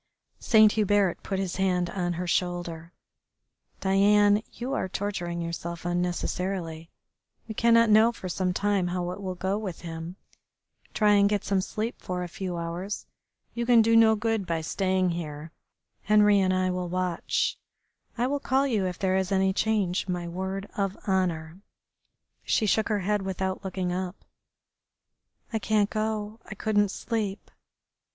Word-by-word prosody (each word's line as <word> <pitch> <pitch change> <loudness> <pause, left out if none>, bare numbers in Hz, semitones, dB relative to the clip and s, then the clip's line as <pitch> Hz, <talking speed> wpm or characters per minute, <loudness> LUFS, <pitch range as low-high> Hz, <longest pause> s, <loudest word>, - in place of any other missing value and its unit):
Saint 215 -2 +6
Hubert 205 -4 +2
put 195 - -3
his 190 -2 -2
hand 180 -2 +1
on 175 -2 -1
her 175 +2 -3
shoulder. 175 -2 -2 0.9
"Diane, 205 +2 +4
you 250 +3 -5
are 190 - -1
torturing 175 -4 -3
yourself 170 0 -5
unnecessarily. 175 -1 -2 0.6
We 220 - -5
cannot 230 0 +4
know 220 +2 +6
for 190 - -8
some 180 +1 -1
time 200 -1 +1
how 175 0 -2
it 200 - -7
will 185 -2 -4
go 190 +3 -1
with 190 -6 -6
him. 165 +1 -6 0.8
Try 210 -2 +4
and 200 -1 +5
get 205 -1 0
some 195 -1 +1
sleep 215 +5 -4
for 180 0 -3
a - - -4
few 180 0 -5
hours. 170 +4 -4 0.5
You 235 - -2
can 235 -2 +6
do 230 +1 +3
no 225 -1 +6
good 220 -3 -1
by 165 -1 -1
staying 185 +2 0
here. 155 -2 -6 0.6
Henri 210 -1 +6
and 190 -1 +2
I 185 0 +1
will 180 -1 -3
watch. 180 -1 -1 0.6
I 240 - +1
will 285 +2 0
call 270 0 +1
you 215 -8 +1
if 180 -1 -4
there 190 -1 +1
is 190 0 -1
any 190 0 +2
change, 200 -3 0
my 175 -2 -3
word 190 +3 -4
of 195 -1 -1
honour." 175 -3 -1 0.8
She 220 - +1
shook 220 +2 +2
her 210 -2 0
head 205 +2 0
without 190 0 -3
looking 185 -2 -2
up. 185 +1 -5 1.3
"I 220 - +1
can't 210 -1 +1
go. 215 0 -2
I 215 - -8
couldn't 205 -1 +1
sleep." 210 -1 -3
190 Hz, 160 wpm, -27 LUFS, 180-210 Hz, 1.3 s, Saint